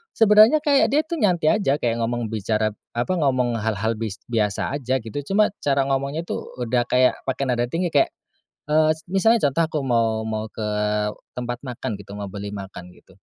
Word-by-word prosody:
sebenarnya 215 +5 +6
kayak 285 -3 +4
dia 295 +4 +3
tuh 330 -1 -4
nyantai 180 0 +3
aja, 140 -8 +2
kayak 120 -4 -1
ngomong, 115 -1 -2
bicara 110 0 0 0.2
apa, 120 +10 0
ngomong 125 -5 +1
hal-hal 110 +1 -1
bis 110 -4 -3 0.2
biasa 105 -1 0
aja 130 0 -1
gitu. 115 +6 -5
Cuma 210 +1 +3
cara 140 -1 +1
ngomongnya 140 +4 -1
itu - - -4 0.2
udah 120 +1 0
kayak 125 0 +3
pakai 135 +1 -1
nada 120 -1 0
tinggi. 170 +2 -1
Kayak, 140 - +4 0.6
eee, 155 +1 +4 0.2
misalnya 205 -1 +3
contoh 165 +5 +1
aku 155 -1 -3
mau 115 -4 +1
mau 110 0 -3
ke 110 - -7 0.7
tempat 120 -1 -4
makan 125 -2 -4
gitu, 100 0 -12
mau 100 -1 -5
beli 100 +1 -6
makan 95 -3 -9
gitu. 95 0 -22
125 Hz, 180 wpm, -23 LUFS, 110-155 Hz, 0.7 s, sebenarnya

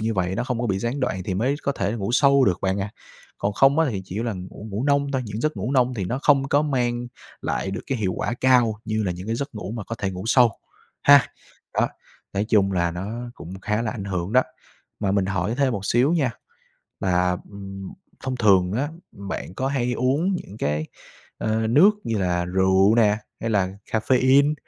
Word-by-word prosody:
như 110 0 -1
vậy, 95 0 0
nó 120 - -1
không 125 -2 -2
có 120 - 0
bị 95 -3 0
gián 120 +6 -2
đoạn 95 -7 -1
thì 95 - -2
mới 125 +8 +1
có 140 - 0
thể 100 -5 -1
ngủ 110 0 -3
sâu 140 0 +5
được 90 -5 +2
bạn 95 +1 0
ạ. 100 +1 -3 0.5
Còn 100 - -1
không 135 +7 +4
á 165 - +4
thì 95 -3 -4
chỉ 100 +5 -4
là 115 -2 -1
ngủ 95 +3 -8
ngủ 105 +7 -2
nông 140 -1 +2
thôi, 130 - 0
những 105 +2 -5
giấc 155 -5 -1
ngủ 110 +7 -2
nông 125 -2 +2
thì 100 -5 -2
nó 125 +8 -2
không 135 -2 +4
có 145 +2 +3
mang 120 -4 -1 0.3
lại 95 - -2
được 100 - -4
cái 135 -4 -2
hiệu 95 -4 0
quả 120 - -2
cao 125 -4 +4
như 110 0 -1
là 90 -3 -1
những 90 +3 -8
cái 115 +1 -1
giấc 140 -1 -5
ngủ 100 -1 -5
mà 115 -4 -5
có 115 - -5
thể 95 - -1
ngủ 90 0 -6
sâu, 120 -1 +5 0.5
ha. 140 -1 +7 0.5
Đó, - - +2 0.4
nói 100 +2 0
chung 100 -3 +3
là 85 -2 +1
nó 110 +8 -5
cũng 95 +3 -9
khá 105 +3 -1
là 110 - -1
ảnh 100 -4 -6
hưởng 95 0 -3
đó. 130 - +6 0.6
Mà 100 -2 +1
mình 100 -2 +1
hỏi 95 +3 -1
thêm 135 -2 +2
một 100 -3 -4
xíu 130 +7 +3
nha, 140 -8 +2 0.7
là, 90 -1 +1
ừm, 95 -1 -8 0.3
thông 130 -1 -2
thường 95 -6 +4
á, 140 +6 -1 0.2
bạn 100 -2 -6
có 130 - -1
hay 125 -3 0
uống 150 +10 +1
những 105 - -8
cái, 75 +2 -1 0.5
ờ, 110 0 0
nước 150 - +6
như 115 -2 -1
là 90 -2 0
rượu 95 +3 +3
nè, 105 -2 +4 0.2
hay 115 - -2
là 100 -4 +2 0.2
caffeine, 130 +5 +4
110 Hz, 225 wpm, -23 LUFS, 95-130 Hz, 0.7 s, ha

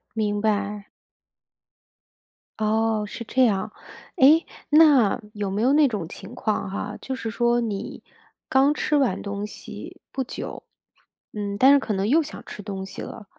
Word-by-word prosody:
明 210 -1 0
白。 205 -1 -1 1.7
哦， 220 0 +1
是 230 - -7
这 255 +3 +3
样。 210 -1 0 0.5
诶， 310 +3 +6 0.2
那 295 -9 +5
有 205 -2 -3
没 200 +2 -2
有 260 +3 +4
那 295 -1 +5
种 205 -9 -3
情 200 +7 -10
况 215 -4 -1
哈， 205 +2 -4
就 265 - -4
是 225 -3 -4
说 240 +1 +2
你 210 -3 -5 0.4
刚 270 +2 +4
吃 300 - 0
完 255 -10 +1
东 200 0 -4
西 210 - -10
不 265 - -2
久， - - -7 0.7
嗯 205 -1 -4
但 265 +5 +7
是 285 - +6
可 225 -5 -3
能 195 +1 0
又 305 +8 +4
想 310 0 -8
吃 - - -8
东 195 -2 -5
西 190 0 -8
了， 225 - -8
220 Hz, 170 characters per minute, -24 LUFS, 205-260 Hz, 1.7 s, 但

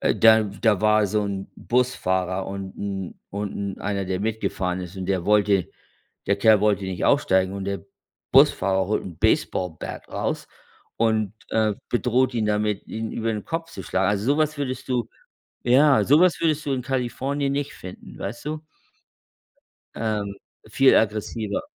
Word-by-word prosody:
äh, - - +2
da 110 -1 +6
da 105 0 0
war 105 -1 +4
so 105 +2 0
'n 100 -1 -4
Busfahrer 95 -7 0
und 95 -1 -6
'n 95 -2 -4 0.2
und 100 0 -4 0.2
'n - - -15
einer, 100 -1 -2
der 95 0 -2
mitgefahren 100 -4 -2
ist 90 +1 -8
und 95 -1 -5
der 95 -3 0
wollte 100 -3 +3 0.6
der 100 - +2
Kerl 110 0 +5
wollte 105 -2 +2
nicht 95 -2 -3
aussteigen, 95 -10 +3
und 100 -1 -5
der 100 0 -3 0.5
Busfahrer 95 0 +4
holt 105 - -1
'n 85 -4 -9
baseball 90 -3 +1
bat - - -7
raus - - -3 0.5
und, 110 -3 +1 0.2
äh, 110 -2 +2
bedroht 125 +1 +1
ihn 110 -3 0
damit, 105 -1 0
ihn 110 0 -5
über 115 0 -1
den 105 -1 -5
Kopf 165 0 -4
zu 95 - -7
schlagen. 95 +1 0
Also, 100 +1 -1
so 145 - -1
was 155 -1 +1
würdest 130 -2 -4
du 120 -3 -1 0.6
ja, 135 +3 +5
so 145 +3 +5
was 180 -1 +4
würdest 155 -2 0
du 140 - 0
in 130 - -1
Kalifornien 135 +2 -1
nicht 140 0 -2
finden, 90 0 -11
weißt 110 +7 -6
du? 155 +1 -4 1.3
Ähm. 105 -3 -2 0.3
Viel 135 +5 +5
aggressiver. 110 -1 0
105 Hz, 170 wpm, -24 LUFS, 95-125 Hz, 1.3 s, da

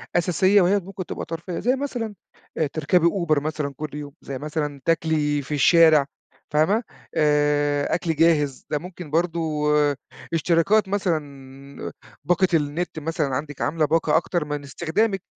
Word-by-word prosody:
أساسية، 185 +3 +4
وهي 195 +3 +3
ممكن 190 0 -7
تبقى - - -5
ترفيهية. 165 +2 -5
زي 250 +2 +2
مثلًا 245 -6 -4 0.4
آآ 155 - +1
تركبي 160 +4 +2
Uber 170 -5 +1
مثلًا 150 -1 -3
كل 150 -2 -6
يوم 145 -1 -7
زي 135 -1 -6
مثلًا 150 -1 -4
تَاكلِي 155 -3 +1
في 140 +2 -6
الشارع 155 0 +5 0.5
فاهمة 190 +10 +2 0.3
آآ 145 -1 +2
أكل 165 -2 -1
جاهز 150 -4 +2
ده 150 - 0
ممكن 175 -3 -9
برضه 170 +1 +1 0.9
اشتراكات 170 +6 +3
مثلًا، 140 -8 -4 0.3
باقة 180 +4 +2
النت 155 +2 -1
مثلًا، 150 -3 -2
عندِك 145 +1 -5
عاملَة 155 0 +1
باقة، 160 0 +2
أكتر 170 -1 -1
من 145 -1 -4
استخدامِك 175 +8 -1
160 Hz, 140 wpm, -23 LUFS, 145-175 Hz, 0.9 s, الشارع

